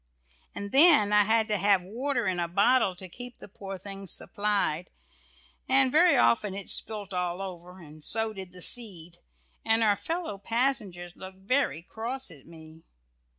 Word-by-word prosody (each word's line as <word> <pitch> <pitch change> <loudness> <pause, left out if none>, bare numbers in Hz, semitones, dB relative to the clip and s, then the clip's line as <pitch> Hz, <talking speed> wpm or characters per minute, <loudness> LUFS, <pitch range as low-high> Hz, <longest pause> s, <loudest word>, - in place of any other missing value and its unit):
And 200 0 -6
then 275 -9 +6
I 210 0 +5
had 220 +1 +2
to 210 - +1
have 195 -1 +2
water 240 +5 -2
in 185 -2 -1
a 170 - -1
bottle 200 +2 +2
to 185 +1 -7
keep 245 +6 -10
the - - -12
poor 195 -1 -8
things 195 0 -6
supplied, 200 -5 0 0.8
and 265 0 +4
very 335 +4 +5
often 120 - +2
it 200 -1 -4
spilt 205 -3 +1
all 180 0 -2
over, 180 -1 -8
and 155 -2 -13
so 225 +3 +2
did 190 -3 -9
the 180 -1 -7
seed, 180 -8 -2 0.4
and 225 +1 +2
our 210 -2 +3
fellow 325 - -5
passengers 210 -7 -2
looked 190 0 -11
very 195 - -1
cross 240 +7 -5
at 140 - -14
me. 160 -1 -14
200 Hz, 165 wpm, -27 LUFS, 180-230 Hz, 0.8 s, then